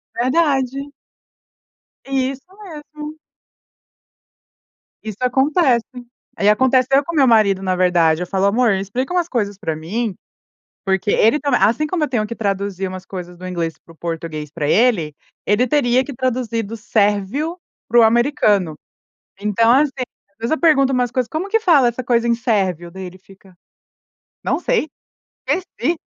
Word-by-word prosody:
Verdade. 275 +1 0 1.1
Isso 270 +1 -2 0.2
mesmo. 300 -3 -9 1.8
Isso 215 -3 -7
acontece. 265 -1 +2 0.5
Eh, 200 - -1
e - - +6
aconteceu 260 +4 +3
com 340 - -5
o - - -4
meu 275 -3 +4
marido, 210 -5 +4
na 185 -1 0
verdade, 175 -3 +2
eu 180 - -3
falo: 190 +2 0
"Amor, 230 +2 +3
explica 200 - -3
umas 355 -2 +1
coisas 205 -5 -2
pra 165 -7 -3
mim?", 200 +7 -3 0.7
porque 195 +2 0
ele 230 +7 +3
também 280 -4 +1
assim 240 +8 +3
como 330 -1 -1
eu 300 - -1
tenho 220 -5 0
que 235 - -6
traduzir 195 -2 -2
umas 185 0 -8
coisas 180 -2 -8
do 185 +1 -8
inglês 170 -3 -3
pro 165 - -16
português 160 -3 -5
pra 150 -2 -3
ele, 180 -7 +2 0.3
ele 210 +5 +2
teria 255 -2 +2
que 280 - -7
traduzir 240 -2 -2
do 220 +2 -7
sérvio 215 - 0 0.3
pro 235 +1 +6
americano. 220 - +2 0.7
Então, 210 +3 +2
assim, 285 +2 +4 0.4
às 200 - -41
vezes 230 +1 -3
eu 315 - 0
pergunto 275 -5 +4
umas 250 -2 +1
coisas: 250 -2 -1
"Como 325 - -3
que 450 +2 +2
fala 310 - +4
essa 240 +2 -4
coisa 235 -1 +1
em 235 - +3
sérvio?", 190 - -1
daí 190 +2 -8
ele 180 +1 -10
fica: 190 0 -19 0.9
"Não - - 0
sei, 470 -11 0 0.6
esqueci". 350 -2 -1
230 Hz, 155 wpm, -19 LUFS, 190-270 Hz, 1.8 s, e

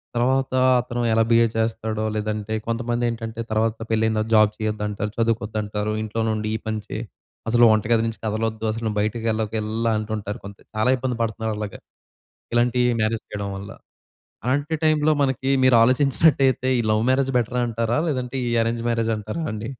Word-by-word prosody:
తరువాత 130 +2 +1 0.3
అతను 120 0 -4
ఎలా 115 0 +4
బిహేవ్ 115 -1 +4
చేస్తాడో 110 -1 -1
లేదంటే 105 0 -3
కొంతమందెంటంటే 115 -1 -2
తరువాత 110 +1 +1
పెళ్లైన 110 0 +2
తర్వాత 110 +1 -1
జాబ్ 110 -1 +5
చేయొద్దంటారు, 105 -1 -3
చదువుకోవద్దంటారు, 110 -2 -1
ఇంట్లోనుండి 110 0 -1
ఈ - - 0
పని 110 -1 -2
చెయి. 110 - -4 0.5
అసలు 120 +1 +5
వంట 110 -1 +2
గది 115 -1 +4
నుంచి 115 - -5
కదలొద్దు 110 +1 -2
అసలు 115 +1 -5
నువ్వు 105 -1 -2
బయటికేళ్ళకిలలా 110 0 -1
అంటుంటారు 105 -1 -4
కొంత 100 0 -9 0.2
చాలా 110 +4 +2
ఇబ్బంది 125 -1 -2
పడుతున్నారు 110 -1 -2
అలాగా. 105 -2 -5 0.8
ఇలాంటి 120 +1 +2 0.2
మ్యారేజ్ 110 +1 0
చేయడం 100 -1 -4
వల్ల. 100 +1 -8 0.7
అలాంటి 145 +5 0
టైమ్‌లో 155 0 +3
మనకి 135 0 0
మీరాలోచించినట్టయితే 130 +2 +4
ఈ - - +2
లవ్ 110 0 +3
మ్యారేజ్ 135 0 +2
బెటరంటారా? 120 -1 -1
లేదంటే 130 -2 -2
ఈ - - -1
అరేంజ్ 115 0 -2
మ్యారేజంటారా 110 +4 -2
అండి? 110 +1 -5
115 Hz, 145 wpm, -23 LUFS, 110-120 Hz, 0.8 s, జాబ్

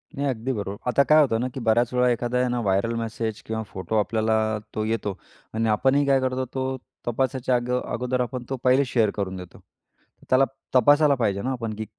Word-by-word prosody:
नाही, 140 +1 -1
अगदी 125 +1 -2
बरोबर. 100 -2 -4
आता 140 +3 +4
काय 155 0 +7
होतं 115 -6 +2
ना, 125 - -1
की 135 - -5
बऱ्याच 120 +2 +2
वेळा 125 0 +3
एखादा 120 +1 0
आहे 125 - +2
ना, 120 0 -1
व्हायरअल 100 +3 +1
मेसेज 110 -1 -4
किंवा 110 0 -3
फोटो 95 +4 -4
आपल्याला 110 +1 +1 0.4
तो 110 - -1
येतो 105 -3 -2 0.4
आणि 115 0 0
आपणही 135 +6 +3
काय 135 -1 +4
करतो 130 0 -1
तो 130 0 -2 0.3
तपासाच्या 130 +1 0
अग 120 0 -2
अगोदर 125 +1 -2
आपण 125 0 -3
तो 135 - -2
पहिले 130 +2 +4
शेअर 115 -4 +2
करून 95 -2 -3
देतो. 90 -1 -11 0.7
त्याला 130 +1 +5 0.3
तपासायला 145 +3 +5
पाहिजे 100 -5 0
ना 130 +4 -2
आपण, 115 -4 -3
की 110 +1 -5
120 Hz, 200 wpm, -24 LUFS, 110-130 Hz, 0.7 s, काय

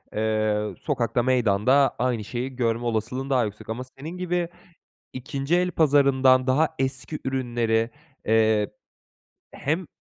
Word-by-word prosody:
eee, 110 -1 0
sokakta, 120 -4 0
meydanda 125 +2 +3
aynı 120 -3 0
şeyi 125 +4 -5
görme 120 -1 0
olasılığın 120 +4 -2
daha 130 -4 +2
yüksek 105 +1 -8
ama 115 +3 -3
senin 160 +6 -7
gibi 180 -1 -1 0.6
2'nci 135 +4 -2
el 180 0 +1
pazarından 135 -5 +4
daha 145 +5 +3
eski 135 +3 -2
ürünleri, 120 -3 0 0.4
eee, 110 -1 +3 0.8
hem, 160 +5 -2
130 Hz, 120 wpm, -25 LUFS, 115-140 Hz, 0.8 s, pazarından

